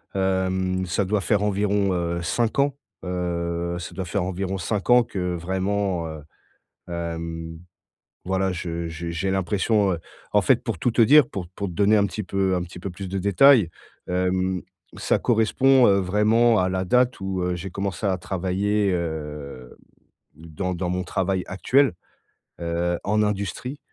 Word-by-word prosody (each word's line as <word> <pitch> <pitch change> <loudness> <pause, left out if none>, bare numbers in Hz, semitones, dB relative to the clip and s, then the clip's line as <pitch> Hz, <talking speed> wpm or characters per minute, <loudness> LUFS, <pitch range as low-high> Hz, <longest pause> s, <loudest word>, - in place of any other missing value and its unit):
Hem, 95 -1 0
ça 95 +3 0
doit 105 +2 0
faire 105 +1 +1
environ, 100 -1 +1
heu, 85 -1 -1
5 115 +8 0
ans, 140 0 +2 0.3
heu, 85 -1 -2
ça 90 - -7
doit 95 -2 -4
faire 90 +2 -1
environ 95 +1 -3
5 100 +5 -3
ans 125 0 +7
que 90 -4 -3
vraiment 95 0 -1
heu, 80 -2 -8 0.6
hem, 80 -1 -5 0.7
voilà, 95 0 0
je 85 -1 -4
je 85 +1 -6
j'ai 95 +3 -2
l'impression 95 +1 +1
heu, 85 - -3 0.3
en - - +4
fait, - - +3
pour - - -3
tout 125 - +1
te 115 - 0
dire, 145 +3 +7
pour 90 -6 -6
pour 100 +2 -5
te - - -7
donner 105 +4 +3
un 100 - +4
petit 105 +3 -5
peu, 95 0 0
heu, - - +3
un 90 - -1
petit 90 0 -9
peu 95 +1 -5
plus 95 +1 -7
de 95 +1 -3
détails, 100 - +5 0.4
hem, 90 0 0 0.4
ça - - +1
correspond, 125 +3 +4
heu, 100 - +5
vraiment 110 +4 +3
à 90 - +1
la 95 0 -1
date 125 +4 +2
où, 95 -1 -3
heu, 90 0 0
j'ai 95 +2 -6
commencé 100 +2 -4
à 95 -2 +1
travailler, 95 +2 0
heu, 75 -6 -5 0.6
dans 85 +3 -4
dans 90 0 -3
mon 90 +1 -1
travail 95 +1 -1
actuel, 135 +9 +2 0.7
heu, 85 +1 -1
en 105 +2 +2
industrie. 105 - -3
95 Hz, 170 wpm, -24 LUFS, 85-100 Hz, 0.7 s, ans